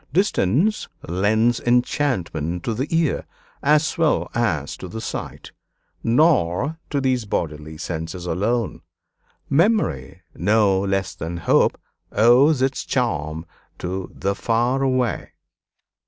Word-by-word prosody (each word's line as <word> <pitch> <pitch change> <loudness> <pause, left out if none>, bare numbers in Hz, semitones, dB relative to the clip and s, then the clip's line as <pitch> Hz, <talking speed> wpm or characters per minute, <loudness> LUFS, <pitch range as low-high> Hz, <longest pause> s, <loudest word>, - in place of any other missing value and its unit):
Distance 180 - +1 0.2
lends 110 +7 +2
enchantment 95 - 0
to 115 - -1
the 130 +6 -2
ear 165 -3 0 0.3
as 150 +4 +2
well 160 -2 +1
as 85 - -1
to 95 - -8
the 100 +6 -6
sight; 110 - -6 0.5
nor 140 - +2
to 145 - 0
these 130 -4 0
bodily 80 -5 -3
senses 85 +2 -5
alone. 105 +6 -1 0.7
Memory, 150 - +1
no 100 0 +3
less 95 0 -1
than 85 +2 -5
hope, 85 - +2 0.3
owes 125 +6 +5
its 135 0 0
charm 80 - -2 0.3
to 95 +1 -4
'the 100 - -1
far 120 +5 0
away.' 130 -3 0
115 Hz, 110 wpm, -22 LUFS, 90-135 Hz, 0.7 s, owes